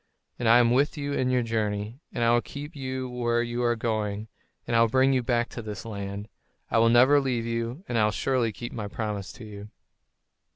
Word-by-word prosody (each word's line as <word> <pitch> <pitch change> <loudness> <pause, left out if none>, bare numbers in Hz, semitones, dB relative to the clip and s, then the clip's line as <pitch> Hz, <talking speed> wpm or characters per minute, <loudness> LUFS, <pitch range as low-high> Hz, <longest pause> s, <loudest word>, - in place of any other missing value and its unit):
And 120 -2 +2
I 115 - +8
am 120 -1 +4
with 140 +5 +2
you 145 -1 -3
in 130 -2 +1
your 125 -1 +2
journey, 110 +1 -2
and 120 - -2
I 115 - +4
will 120 0 +4
keep 145 +5 -8
you 130 -2 -4
where 120 -1 0
you 120 0 -3
are 120 -1 +2
going, 110 -2 -2 0.4
and 120 - -1
will 115 0 +5
bring 130 +3 +3
you 130 - +2
back 120 0 +1
to 115 - -6
this 105 -2 -7
land. 100 -1 -5 0.4
I - - +4
will 115 0 +5
never 130 +5 +6
leave 125 -4 -1
you, 115 +6 -3
and 120 -2 0
I 105 - +4
will 105 - +2
surely 125 -1 0
keep 120 +4 -7
my 105 -3 -4
promise 105 -3 -4
to 120 - -11
you." 105 0 -9
120 Hz, 220 wpm, -27 LUFS, 110-125 Hz, 0.4 s, I